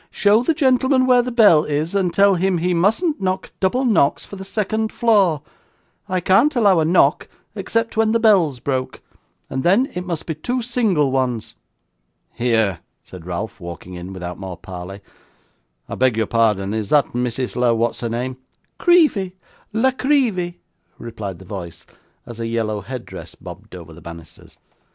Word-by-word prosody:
'Show 210 +2 +3
the 310 +6 0
gentleman 260 -2 +3
where 250 -1 +5
the 250 +1 -4
bell 205 -10 +5
is, 150 +3 -2
and 190 -3 +1
tell 200 +2 +4
him 185 0 +1
he 180 +2 0
mustn't 225 - +1
knock 185 0 -2
double 245 +8 +1
knocks 205 - +2
for - - -10
the 190 - -8
second 220 +2 -2
floor; 195 - +2 0.7
I 185 0 0
can't 225 - +3
allow 200 -7 +4
a 155 - +2
knock 170 +3 +3 0.2
except 230 0 -2
when 220 0 +2
the 230 - +2
bell's 185 - +3
broke, 130 0 -3 0.5
and 130 - -3
then 200 - +2
it 180 - -4
must 170 -4 -5
be 160 - -3
two 245 - -3
single 215 - +1
ones.' 125 -4 -2 0.8
'Here,' 110 -6 0 0.2
said 90 -2 -12
Ralph, 95 +6 -5
walking 85 +1 -9
in 90 +1 -8
without 90 -2 -7
more 95 -3 -7
parley, 90 +2 -9 0.9
'I - - -7
beg 130 -3 +1
your 110 - +1
pardon; 105 -3 +1
is 110 -2 -3
that 145 -2 +2
Mrs. 125 +1 -2
La 125 -1 +2
what's 115 0 0
her 120 - -2
name?' 125 +2 -3 0.4
'Creevy 300 - +3 0.4
La 225 +5 +2
Creevy,' 235 -11 0 0.4
replied 110 -5 -7
the 95 - -14
voice, 90 -3 -8 0.4
as 115 -1 -10
a 115 - -3
yellow 110 -2 -2
headdress 125 +4 -8
bobbed 95 +4 -11
over 85 -2 -11
the 85 - -14
banisters. 85 -1 -12
155 Hz, 170 wpm, -20 LUFS, -, 0.9 s, where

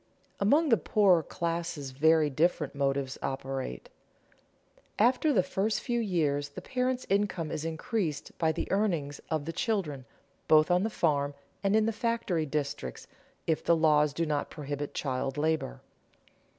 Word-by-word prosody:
Among 290 +11 +3
the 230 - +5
poorer 185 0 +4
classes 165 -4 -3
very 155 +2 +3
different 150 0 +1
motives 140 -1 -1
operate. 135 - -4 1.1
After 255 +7 +3
the 195 -9 +3
first 195 +4 0
few 240 -2 -1
years 150 -9 0
the 145 - -9
parents' 255 0 -1
income 190 -5 0
is 155 -1 -3
increased 165 - -3
by 160 -1 +3
the - - -3
earnings 170 -9 0
of 155 -3 -1
the 165 - -4
children, 165 - -2 0.4
both 155 +2 +5
on 180 +1 +4
the 220 - 0
farm 145 -7 0 0.3
and 200 +1 +2
in 220 0 +4
the 225 - 0
factory 220 -9 -1
districts 140 - -3 0.4
if 160 -2 0
the 170 - +4
laws 150 -2 +4
do 165 +4 -1
not 150 -2 -1
prohibit 145 -1 -5
child 135 -1 -2
labor. 155 - -1
160 Hz, 150 wpm, -29 LUFS, 145-200 Hz, 1.1 s, the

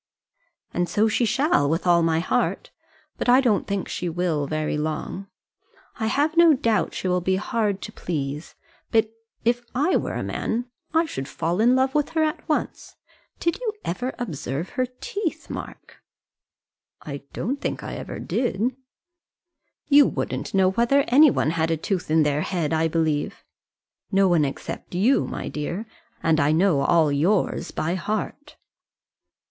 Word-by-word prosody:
"And 175 0 0
so 215 +2 +2
she 230 +2 +1
shall, 255 - +2
with 165 +4 -1
all 175 -1 +5
my 165 -1 +2
heart. - - -1 0.5
But - - 0
I 250 +2 +7
don't 235 -7 +2
think 200 -2 -2
she 175 - -3
will, 165 -4 -1
very 155 +1 -1
long. 155 +5 -3 0.7
I 220 - 0
have 295 +7 +1
no 335 -2 +7
doubt 230 -5 0
she - - -3
will 180 0 +1
be 185 +2 +1
hard 210 -1 -1
to 215 - -6
please; 150 -6 -4 0.3
but 220 -1 +2 0.3
if 240 +1 +2
I 295 +8 +2
were - - -3
a - - -2
man 235 +2 -2 0.3
I 325 +2 +3
should 135 - -5
fall 175 +5 -1
in 245 +3 +5
love 260 +1 +2
with 295 -1 +1
her 315 - +4
at 310 +1 -3
once. 305 - -2 0.4
Did 335 - 0
you 460 -4 -2
ever 250 +10 -3
observe 160 - -4
her 255 0 -1
teeth, 325 +6 -5
Mark?" - - -8 1.1
"I 140 -2 -6
don't 270 +8 -3
think - - -3
I - - -5
ever - - -6
did." 245 0 -1 1.1
"You 290 -1 +7
wouldn't - - -3
know 190 -1 +4
whether 240 +7 +3
any 290 +5 +7
one 135 - +1
had 165 0 0
a 165 - +1
tooth 180 +2 -3
in 160 0 +4
their 150 0 +1
head, 165 -3 -1
I 160 0 +2
believe." 160 -2 -1 0.7
"No 195 0 +4
one 170 -5 +3
except 140 +5 -6
you, 225 +10 +3
my - - -5
dear; 170 +8 -4 0.4
and 160 -1 +3
I 145 0 +3
know 165 -1 +3
all 160 0 +3
yours 175 +8 +1
by 165 +3 -2
heart." 215 +9 -4
190 Hz, 165 wpm, -24 LUFS, 160-250 Hz, 1.1 s, I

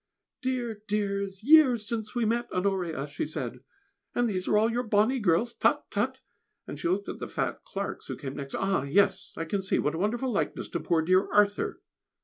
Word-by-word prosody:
"Dear, 245 -5 -2
dear, 200 -1 0 0.2
years 260 -6 +6
since 220 0 -3
we 240 -2 +1
met, 235 +2 0
Honoria," 180 -6 -1
she 145 0 -4
said; 130 -5 -4 0.6
"and 245 0 +2
these 185 -4 -2
are 210 - +4
all 220 +1 +4
your 240 +2 0
bonny 220 +3 +2
girls, 205 +4 +2
tut, - - +2
tut!" 260 +6 -1 0.4
and - - -7
she - - -1
looked 195 +4 0
at - - -5
the - - -4
fat - - -2
Clarks - - -5
who - - -5
came 135 -2 -6
next. 140 -1 -6
"Ah! 195 -5 +1
yes 190 +7 +2
I 165 - -2
can 195 +4 -1
see! 190 - 0
What 150 - 0
a 160 - -3
wonderful 240 +6 0
likeness 205 - -2
to - - -2
poor 165 -3 +1
dear 185 +4 +3
Arthur!" 205 0 +2
205 Hz, 200 wpm, -28 LUFS, 180-235 Hz, 0.6 s, years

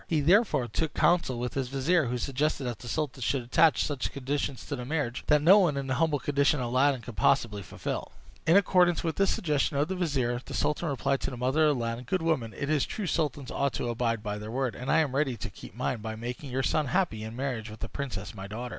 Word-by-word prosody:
He 160 - +1
therefore 170 - +3
took 150 +7 -2
counsel 170 -8 +2
with 125 +1 -3
his 135 -2 -1
vizier, 140 +5 +2
who 125 +1 -1
suggested 140 +3 -1
that 120 -2 -4
the 120 - -10
sultan 145 0 -2
should 130 +2 0
attach 155 +6 +4
such 145 -4 -2
conditions 140 0 -3
to 145 - -3
the 125 - -6
marriage 135 -2 -2
that 150 0 +4
no 190 +6 +8
one 165 -8 +2
in 140 - -2
the 130 - -1
humble 160 -3 +3
condition 145 +2 +1
of 120 -2 -2
Aladdin 130 +1 +2
could 115 0 -9
possibly 115 -6 +2
fulfil. 85 - -5 0.4
In 165 +4 +7
accordance 180 -3 +3
with 165 -2 -2
this 195 -1 +3
suggestion 150 -8 0
of 145 +4 +1
the 190 - -1
vizier, 135 -9 0
the - - -7
sultan 150 +2 0
replied 135 0 0
to - - -2
the 125 - -7
mother 135 +6 +2
of 145 -3 +2
Aladdin: 115 +1 -3
"Good 180 +6 -1
woman, 140 -9 0
it 140 - -3
is 150 -2 +1
true 210 - -4
sultans 150 -6 -1
ought 140 -1 0
to 120 - -2
abide 115 -2 -1
by 105 -1 -3
their 105 +1 -7
word, 125 0 -1
and 125 +3 -4
I 160 - +5
am 140 -4 -1
ready 135 -4 +1
to 115 - -5
keep 95 - -12
mine, 125 0 -2
by 110 0 -5
making 125 +5 -6
your 130 +1 -1
son 150 +3 +1
happy 130 - 0
in 110 +1 -7
marriage 125 -4 -3
with 110 - -11
the 115 - -3
princess 105 -5 -5
my 100 -2 -7
daughter. 120 +4 -5
135 Hz, 250 wpm, -28 LUFS, 120-155 Hz, 0.4 s, no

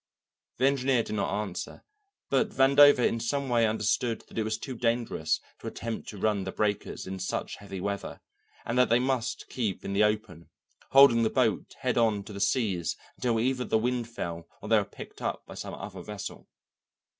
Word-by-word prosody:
The 130 - +2
engineer 135 -3 +3
did 105 - -6
not - - 0
answer, 95 -4 -6 0.5
but 135 - +3
Vandover 140 -1 +6
in 115 - -1
some 140 +4 -1
way 115 -2 +4
understood 110 +2 0
that - - -13
it - - +1
was 110 0 -1
too 130 +3 -6
dangerous 120 0 0 0.2
to - - -8
attempt 115 -1 -5
to 105 - -8
run 105 -1 +1
the 95 - -4
breakers 105 -1 -2
in 95 0 -5
such 95 - -3
heavy 95 -2 -7
weather, 100 +1 -4 0.5
and 120 +2 0
that 125 - +5
they 115 - +5
must 125 -2 -1
keep 110 -7 -3
in 100 - -3
the 100 +2 +4
open, 105 -6 -1 0.4
holding 135 -4 +7
the 110 - +3
boat 115 -7 0
head 125 -2 +1
on 110 -3 +2
to 105 - -10
the 100 - -6
seas 100 - 0 0.2
until 120 -2 +1
either 125 +2 +1
the 110 - +1
wind 120 +1 -1
fell 85 -7 -5
or - - -8
they - - +6
were - - +1
picked - - -11
up - - -3
by - - -10
some - - -6
other 95 -3 -8
vessel. 105 +2 -7
115 Hz, 195 wpm, -28 LUFS, 100-125 Hz, 0.5 s, holding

